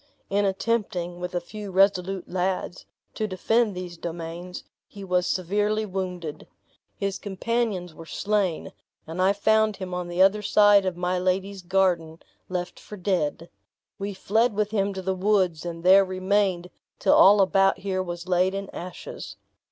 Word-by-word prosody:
In 200 +1 +2
attempting, 190 -4 -1
with 180 0 -5
a - - +2
few 205 +4 -8
resolute 190 -1 +2
lads, 180 0 -2 0.3
to 215 - -2
defend 215 +2 +1
these 180 -1 -6
domains, 170 +2 -6 0.2
he 200 - -11
was 180 -1 +1
severely 210 +4 0
wounded. 180 -5 -5 0.5
His 200 -1 -2
companions 200 -3 -2
were 165 +1 -12
slain, 200 -5 -1 0.3
and 165 +3 -4
I 190 +1 +5
found 220 +1 +2
him 185 -2 -6
on 180 -1 -3
the 175 +1 -5
other 195 +3 +5
side 205 -1 +5
of 180 -2 -2
my 180 +1 0
lady's 190 +2 -1
garden 175 -3 +1 0.3
left 180 -1 -4
for 210 - -10
dead. 170 -4 -1 0.5
We 200 0 -4
fled 220 +4 +1
with 210 0 0
him 200 -2 +1
to 190 - -5
the 190 +1 0
woods, 185 -4 +1
and 165 -1 -6
there 190 +2 +7
remained 185 -1 0 0.3
till - - +3
all 205 +2 +7
about 195 0 +4
here 190 -1 -2
was 175 -1 -6
laid 185 +1 +2
in 195 0 -5
ashes. 180 0 -8
190 Hz, 160 wpm, -25 LUFS, 180-200 Hz, 0.5 s, there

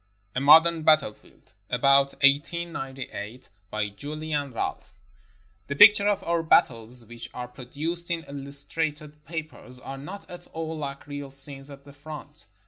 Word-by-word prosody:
A 125 - -2
MODERN 160 +3 +6
BATTLEFIELD 155 -13 0 0.2
[About 140 +2 +3
1898] 135 -6 -1 0.2
BY 105 0 -2
JULIAN 145 +5 -4
RALPH 110 -2 -5 0.7
The 140 - -3
pictures 205 +4 +8
of 205 -2 +1
our 170 0 0
battles 120 -6 +1
which 115 +1 -9
are 125 0 -5
produced 150 +8 -5
in 170 -1 -2
illus 140 0 -6
trated 150 -2 -3
papers 155 -5 -7
are 135 +1 -8
not 190 +9 -9
at 175 0 -11
all 160 0 -4
like 140 -3 -6
real 145 -1 -7
scenes 135 +1 +5
at 140 -1 -12
the 140 0 -15
front. 150 -1 -11
145 Hz, 140 wpm, -26 LUFS, 135-160 Hz, 0.7 s, pictures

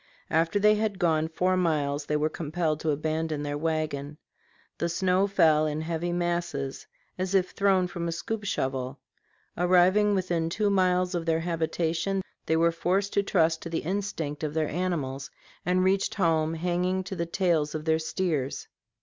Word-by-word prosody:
After 165 +4 +2
they 210 +1 +5
had 215 -2 -1
gone 160 -3 +2
four 180 +3 +1
miles 150 -5 0
they 150 - 0
were 150 +1 +1
compelled 155 0 -2
to 160 - -2
abandon 155 0 -1
their 145 0 -2
wagon; 155 -2 -2 0.6
the 170 - 0
snow 185 +3 +2
fell 155 -5 +4
in 150 +1 -2
heavy 170 +1 -2
masses 175 -6 -2 0.3
"as 185 +1 -1
if 185 -1 +2
thrown 195 -2 +2
from 175 -1 -4
a - - -1
scoop 210 +6 -4
shovel"; 130 -7 -2 0.6
arriving 185 +4 +4
within 175 -3 0
two 205 +3 +1
miles 185 -1 +2
of 170 -1 -2
their 165 0 +2
habitation, 170 +3 -1 0.2
they 160 - +2
were 170 +1 +4
forced 190 +4 0
to 200 - +3
trust 165 -5 +2
to 170 - -6
the 165 - -2
instinct 165 -5 -3
of 150 0 -3
their 155 -2 +1
animals, 145 -6 -2 0.4
and 185 +1 +3
reached 190 +1 +1
home 165 -4 +1
hanging 180 +2 0
to 190 - -6
the 170 -1 -2
tails 165 -4 +1
of 155 0 -4
their 160 0 +2
steers. 160 -4 -2
170 Hz, 170 wpm, -27 LUFS, 155-185 Hz, 0.6 s, they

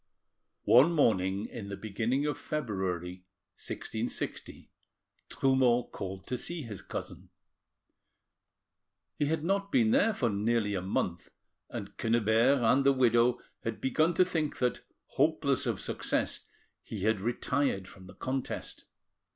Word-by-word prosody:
One 125 +10 +6
morning 100 - +2
in 105 -4 -7
the 100 - -5
beginning 115 +6 -1
of 150 - 0
February 95 - -3 0.3
1660, - - -5 0.6
Trumeau 130 -3 +2
called 95 0 -6
to 125 - -3
see 170 -3 -4
his 105 -6 -7
cousin. - - -7 1.9
He 145 - +2
had 155 0 -1
not 200 +3 0
been 230 -4 +4
there 235 -4 +3
for 120 -4 +1
nearly 105 +1 +1
a 95 - -1
month, 90 -2 -2 0.4
and 100 0 -7
Quennebert 115 +3 +3
and 125 +5 +4
the 140 0 +5
widow 120 -1 +3 0.2
had 115 -2 -3
begun 155 +6 +1
to 185 - +5
think 160 -4 -2
that, 125 -1 0 0.2
hopeless 140 -2 +1
of - - -1
success, - - -2 0.3
he 105 - -7
had 110 -2 +2
retired 120 -2 0
from 95 0 -14
the 95 - -13
contest. 130 +5 -4
120 Hz, 130 wpm, -30 LUFS, 100-140 Hz, 1.9 s, One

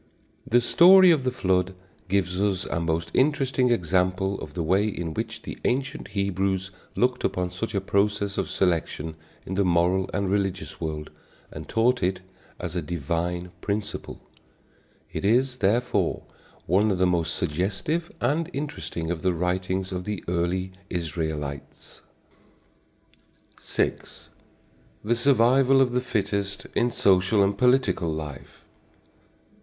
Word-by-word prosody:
The 120 +2 +4
story 185 +8 +7
of 145 -6 +2
the - - +3
flood 95 -5 0 0.3
gives 95 -1 0
us 100 -2 0
a 80 - -2
most 80 0 -1
interesting 135 -2 +2
example 95 -1 +1
of - - -9
the 85 - -1
way 95 +6 +2
in 85 -6 -4
which - - -4
the - - -7
ancient 135 +4 -1
Hebrews 95 -1 -1 0.2
looked 125 0 +1
upon 90 -1 -1
such 100 +4 -4
a 100 - +1
process 100 0 0
of - - -2
selection 80 -3 -1 0.3
in 95 - -5
the 100 +1 +2
moral 90 +1 +2
and 100 -1 -1
religious 95 -2 -2
world 75 -2 -4 0.4
and - - -9
taught 120 +2 +2
it 95 +1 0 0.4
as 90 -1 -5
a 90 - 0
divine 85 +2 -3
principle. 105 0 -4 0.9
It - - -4
is, 125 +5 +2
therefore, 115 +3 +1 0.4
one 100 +5 +3
of 95 - +1
the 95 - +3
most 85 -2 +1
suggestive 95 - -1
and 155 +7 0
interesting 135 - -4
of 85 - -3
the 95 -1 +1
writings 90 +2 -1
of 90 -1 -4
the 105 -4 -4
early 90 +2 -1 0.2
Israelites. 80 -5 -5 1.6
VI. - - +1 1.1
THE 120 +3 +1
SURVIVAL 130 +2 +4
OF 130 -2 +3
THE 125 +1 +1
FITTEST 100 -4 -2
IN 120 - +2
SOCIAL 100 -1 +3
AND 100 +1 +1
POLITICAL 125 -8 +2
LIFE. 75 -4 -8
95 Hz, 135 wpm, -25 LUFS, 90-115 Hz, 1.6 s, story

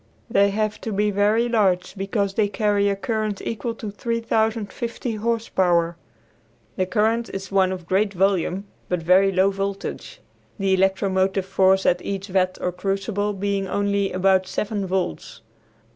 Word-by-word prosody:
They 200 -1 +4
have 215 +1 -2
to 225 - -4
be 210 +1 +1
very 210 +4 +2
large 200 -6 +1
because 195 0 -1
they 210 0 +2
carry 205 -1 +1
a 200 - 0
current 215 -1 -2
equal 230 +1 -4
to 215 -2 -6
3050 230 +1 -2
horse 230 +1 -1
power. 170 -2 +2 0.8
The 185 - 0
current 220 +5 +1
is 195 0 -6
one 190 -1 +3
of 180 -2 -6
great 195 +3 +1
volume, 195 0 0 0.2
but 180 -2 -1
very 190 +3 +5
low 190 +1 +3
voltage; 195 - -5 0.4
the 195 -2 +1
electromotive 190 0 +1
force 190 0 +3
at 175 0 +3
each 195 0 -4
vat 185 -1 +1
or 180 - -1
crucible 195 +3 -2
being 200 0 -1
only 200 0 0
about 190 0 +2
seven 205 0 -2
volts. 185 - -3
195 Hz, 150 wpm, -23 LUFS, 190-210 Hz, 0.8 s, very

